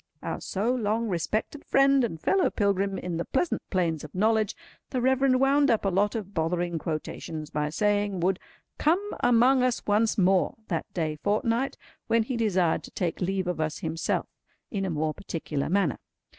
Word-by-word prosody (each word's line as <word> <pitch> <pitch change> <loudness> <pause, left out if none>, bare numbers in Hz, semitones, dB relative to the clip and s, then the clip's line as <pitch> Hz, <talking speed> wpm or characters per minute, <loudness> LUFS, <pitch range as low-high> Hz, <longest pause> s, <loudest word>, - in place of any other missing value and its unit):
Our - - -4
so 215 +6 0
long 225 -1 0
respected 210 - -2
friend 275 -1 +4
and 165 -9 -2
fellow 385 - +2
pilgrim 200 -2 0
in 175 -2 -3
the 170 - -1
pleasant 325 +6 0
plains 170 -5 0
of 150 - -10
knowledge, 215 +1 +2 0.3
the 255 - -1
Reverend 260 +1 +3
wound 280 +1 +4
up 225 -3 +2
a - - +3
lot 200 +3 +1
of 205 -3 -5
bothering 170 0 -1
quotations 155 -1 -5
by 150 0 -1
saying, 205 +2 +1
would 185 +1 +1 0.4
"come 370 +7 +1
among 245 +2 +4
us 250 -2 0
once 215 +2 +2
more" 190 -1 +3
that 165 -4 -3
day 155 -3 -1
fortnight, 230 - 0 0.3
when 230 0 +3
he 255 +3 -3
desired 190 -7 +1
to - - -13
take 175 -1 -2
leave 190 +1 0
of 180 -3 -2
us 155 0 -1
himself, 160 0 -1 0.5
in 195 -3 -1
a - - -1
more 155 -1 -1
particular 155 -7 -4
manner. 180 - +1
200 Hz, 175 wpm, -27 LUFS, 170-235 Hz, 0.5 s, friend